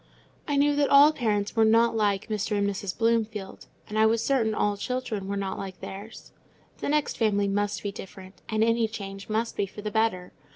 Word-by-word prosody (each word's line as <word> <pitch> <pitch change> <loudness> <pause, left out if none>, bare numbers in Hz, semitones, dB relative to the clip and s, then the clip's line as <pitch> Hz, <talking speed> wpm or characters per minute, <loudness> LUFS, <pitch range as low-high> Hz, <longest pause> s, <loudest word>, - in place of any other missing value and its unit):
I 290 - 0
knew 290 +1 +3
that 290 -1 +2
all 285 +2 +7
parents 210 -6 -1
were 225 - +4
not 230 +1 +4
like 205 -3 +1
Mr. 210 -1 -1
and 200 0 +1
Mrs. 200 -1 -4
Bloomfield, 225 -3 -1 0.2
and 215 +1 -2
I 220 - +6
was 225 0 +1
certain 230 -6 +1
all 205 -1 +1
children 225 -3 -3
were 200 0 -2
not 195 -1 -3
like 190 -1 -7
theirs. 205 +4 -9 0.5
The - - -3
next 300 0 0
family 205 -3 +2
must 205 +1 -1
be 200 - -2
different, 190 -1 -11
and 220 0 +1
any 230 0 +2
change 200 -2 -8
must 225 +2 -1
be 200 - -1
for 205 +2 -10
the 210 - -3
better. 220 -5 0
215 Hz, 205 wpm, -26 LUFS, 200-230 Hz, 0.5 s, all